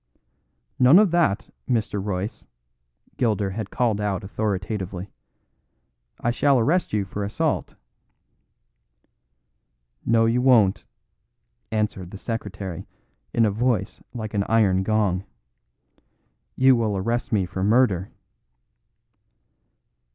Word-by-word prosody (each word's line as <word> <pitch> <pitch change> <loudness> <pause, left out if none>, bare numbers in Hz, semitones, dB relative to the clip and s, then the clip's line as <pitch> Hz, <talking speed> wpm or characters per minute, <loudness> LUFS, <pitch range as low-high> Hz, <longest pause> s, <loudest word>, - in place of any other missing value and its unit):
"None 130 +6 +7
of 205 -3 +5
that, 170 - +1 0.2
Mr. 110 -5 0
Royce," 100 +2 -4 0.7
Gilder 105 -5 0
had 105 0 -5
called 110 -4 0
out 100 -3 -2
authoritatively. 95 -2 -3 1.1
"I 120 - 0
shall 140 +3 +3
arrest 155 +10 +1
you 105 -2 0
for 100 +2 -5
assault." 100 - -2 2.3
"No, 115 0 +3
you 115 +2 +2
won't," 110 -6 +4 0.9
answered 105 -5 -2
the 100 - -9
secretary 95 -5 -5 0.4
in 115 - +3
a 105 - +2
voice 110 -2 -1
like 110 -3 -6
an 100 -1 +1
iron 100 -5 +3
gong, 100 -3 +1 1.3
"you 130 0 +5
will 110 -4 0
arrest 115 +5 -2
me 100 -4 +2
for 95 +1 -4
murder." 105 -4 +2
105 Hz, 105 wpm, -24 LUFS, 95-120 Hz, 2.3 s, None